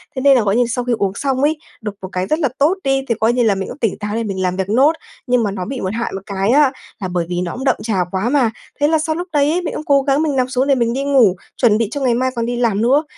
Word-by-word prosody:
thế 260 - -2
nên 275 0 +6
là, - - +3
gọi 200 0 +1
như, 245 +1 +3
sau 245 +1 -2
khi 245 - +1
uống 200 -3 0
xong 270 +1 -1
ấy, 300 +2 +2 0.2
độc 210 -2 -5
một 190 - -5
cái 185 +1 -2
rất 310 - 0
là 290 -5 +1
tốt 315 +7 +2
đi 270 0 +1
thì 230 - +1
coi 225 +2 +3
như 245 0 +2
là 215 -3 +3
mình 190 0 -4
cũng - - -8
tỉnh 225 -9 -1
táo 210 0 -3
để 230 - -1
mình 195 -3 -3
làm 185 -1 0
việc 190 0 -3
nốt, 265 +8 +4 0.4
nhưng 245 -1 +2
mà 205 - -1
nó 185 -2 -4
bị 260 +3 -5
một 190 +1 -2
hại 235 +1 -2
một 195 - -5
cái 195 0 -1
á 280 +1 +5 0.3
là 190 - -3
bởi 175 -1 -2
vì 175 0 -1
nó 175 -1 -3
cũng 260 - -6
đậm 270 - +3
trà 220 -3 -1
quá 195 +5 -1
mà, 255 -5 +2 0.3
thế 290 - +3
là 320 +1 +2
sau 315 0 -1
lúc 350 +2 -4
đấy, 300 +4 +2
mình - - -3
cũng - - -5
cố 280 -1 +4
gắng 275 +1 +1
mình 300 -3 0
nằm 255 -1 +1
xuống 260 +1 0
để 275 - +4
mình 235 -2 0
đi 270 +2 -2
ngủ, 260 -9 +4 0.2
chuẩn 220 -4 +4
bị 225 -1 0
cho 285 - -4
ngày 255 -3 +2
mai 255 +2 0
còn 230 -1 -1
đi 245 +1 -2
làm 225 -4 +1
nữa, 270 +6 +3
245 Hz, 330 wpm, -18 LUFS, 205-275 Hz, 0.4 s, nên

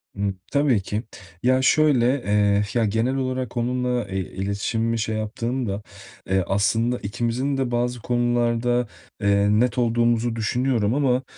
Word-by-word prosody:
Imm, 100 0 -1 0.2
tabii 140 -8 +2
ki. 105 +4 -3 0.4
Ya, 130 +1 +3
şöyle, 140 -3 +4 0.2
eee, 100 0 +3
ya, 115 -2 +2
genel 115 +5 0
olarak 130 -2 -3
onunla, 125 0 -1
eee, 95 0 -3
iletişimimi 100 +5 -2
şey 110 0 -1
yaptığımda, 110 0 -3 0.5
eee, 95 -1 +2
aslında 110 +5 +1
ikimizin 120 +6 -2
de 130 -2 -1
bazı 120 +1 -1
konularda, 120 0 +1 0.3
eee, 100 0 +3
net 120 +4 +2
olduğumuzu 120 -1 +1
düşünüyorum 115 0 0
ama, 135 -2 +1
120 Hz, 130 wpm, -23 LUFS, 105-125 Hz, 0.5 s, şöyle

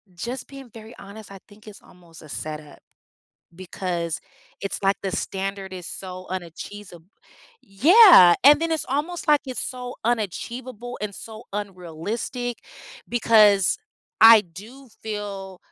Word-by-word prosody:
just 240 +8 -6
being 275 -2 -12
very 225 +1 -12
honest, 200 +1 -12
I 195 - -11
think 215 +1 -19
it's 205 - -12
almost 170 -2 -18
a 155 - -14
set-up. 150 0 -8 0.8
Because, 175 -2 -4 0.4
it's, 195 0 -5
like, 195 +1 +2
the 190 -2 -3
standard 195 0 -4
is 180 -2 -8
so 185 -1 -8
unachees 185 +3 -8 0.7
yeah. 255 - +7
And 295 +3 +7
then 330 0 -1
it's 320 - -2
almost 310 +5 -3
like, 295 -1 +5
it's 255 - -4
so 250 0 -6
unachievable, 240 +2 -4
and 205 -1 -5
so 220 +2 -10
unrealistic, 205 - -5 0.7
because 210 - +5 0.4
I 225 -1 +9
do 220 +10 -14
feel 200 -3 -6
205 Hz, 130 wpm, -23 LUFS, 185-245 Hz, 0.8 s, I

